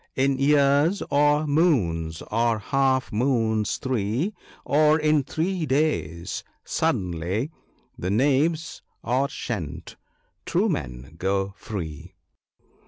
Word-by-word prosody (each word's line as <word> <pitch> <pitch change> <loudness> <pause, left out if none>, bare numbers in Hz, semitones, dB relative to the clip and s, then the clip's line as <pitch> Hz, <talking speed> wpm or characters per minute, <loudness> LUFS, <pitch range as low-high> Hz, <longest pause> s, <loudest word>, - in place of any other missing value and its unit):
— - - -48
" - - -51
In 135 -1 +1
years, 145 +5 +3
or 145 +1 +3
moons, 95 - +1
or 115 +1 +2
half 130 +2 +1
moons 110 -2 +1
three, 130 - -1 0.3
Or 155 +1 +4
in 155 -1 +3
three 160 +4 -2
days 130 - -1
— - - -44
suddenly, 90 - -1 0.5
The 90 - -2
knaves 145 - +1 0.2
are 130 +4 +1
shent 90 -11 -5 0.2
— - - -46
true - - +2
men 60 +6 -5
go 95 +1 0
free." 80 -11 -7
130 Hz, 115 wpm, -25 LUFS, 95-150 Hz, 0.5 s, Or